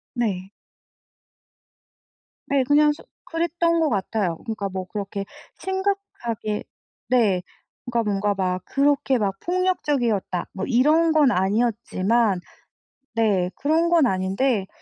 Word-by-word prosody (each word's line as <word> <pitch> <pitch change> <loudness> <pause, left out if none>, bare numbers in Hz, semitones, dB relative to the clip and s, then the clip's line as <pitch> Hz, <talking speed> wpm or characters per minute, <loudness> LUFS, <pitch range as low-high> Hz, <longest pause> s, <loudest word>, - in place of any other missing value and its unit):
네. 195 -5 -2 2.0
네 275 -2 +2
그냥 295 +1 +5
서 - - -14 0.2
그랬던 335 0 0
것 315 -2 +2
같아요. 195 -4 -1
그러니까 210 -3 -3
뭐 185 -1 -4
그렇게 200 -1 -4 0.3
심각하게 380 - -2 0.5
네 215 -8 +3 0.5
그러니까 235 -1 +1
뭔가 205 +1 +1
막 185 -1 -1
그렇게 280 -1 +2
막 195 -3 -1
폭력적이었다 285 - 0
뭐 190 - -3
이런 305 +6 +4
건 295 -5 +5
아니었지만 210 0 +1 0.8
네 200 -6 +2
그런 320 +4 +1
건 335 -5 +5
아닌데 190 +2 0
235 Hz, 235 characters per minute, -23 LUFS, 195-300 Hz, 2.0 s, 그냥